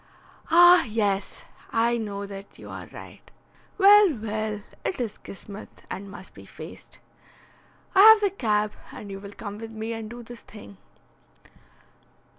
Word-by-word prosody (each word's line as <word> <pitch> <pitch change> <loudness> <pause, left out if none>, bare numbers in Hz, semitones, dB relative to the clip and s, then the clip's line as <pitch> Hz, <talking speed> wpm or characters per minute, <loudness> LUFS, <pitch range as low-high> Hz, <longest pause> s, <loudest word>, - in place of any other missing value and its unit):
"Ah, 350 +1 +8
yes, 205 -3 -2 0.3
I 235 +1 +2
know 200 -3 -4
that 200 0 -10
you - - -11
are - - -8
right. - - -13 0.5
Well, 405 -4 +7
well, 215 -1 -4 0.2
it 360 - -3
is 230 -4 -4
kismet, 200 +1 -11
and 195 +2 -6
must 195 - -12
be - - -13
faced. - - -12 1.0
I 385 - +6
have 440 +1 +9
the 405 -2 +2
cab, 215 - 0 0.2
and 200 - -9
you 195 - -6
will 200 0 -10
come 205 -1 -8
with 225 0 -7
me 220 +1 -5
and 225 -1 -6
do 240 +1 -9
this 235 -1 -11
thing." 100 - -13
220 Hz, 150 wpm, -25 LUFS, 205-245 Hz, 1.0 s, have